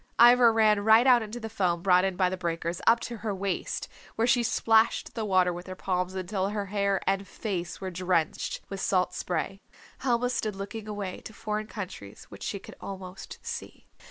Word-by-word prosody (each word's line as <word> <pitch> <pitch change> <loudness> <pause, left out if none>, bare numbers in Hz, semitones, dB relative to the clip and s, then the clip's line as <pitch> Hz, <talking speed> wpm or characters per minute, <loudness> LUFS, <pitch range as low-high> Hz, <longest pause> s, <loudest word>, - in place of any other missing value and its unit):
Ivra 240 0 +8
ran 215 -2 +4
right 220 +3 +6
out 250 -2 +6
into 220 +2 -6
the 225 - -5
foam 180 -6 0
brought 180 -1 +5
in 190 -1 0
by 185 0 +3
the 185 - -2
breakers, 170 -1 -3
up 230 +1 +6
to 235 - -5
her 210 -2 -3
waist, 195 -1 -3 0.3
where 225 - +2
she 245 0 +4
splashed 225 -1 +2
the 225 - -3
water 185 -3 +3
with 175 +2 -8
her 185 - -6
palms 185 0 -2
until 190 +1 -1
her 205 -1 -2
hair 200 -1 0
and 195 0 0
face 185 -6 -4
were 190 -1 -4
drenched 175 -2 -1
with 195 -1 -5
salt 180 -1 +1
spray. 185 +3 -3 0.4
Helma 245 -1 +1
stood 215 -4 -2
looking 205 +2 -6
away 205 -3 -4
to 220 - -10
foreign 215 0 -3
countries 185 - -8
which 100 - -12
she - - -3
could 195 - -12
almost 190 -1 -8
see. - - -7
195 Hz, 195 wpm, -28 LUFS, 185-220 Hz, 0.4 s, Ivra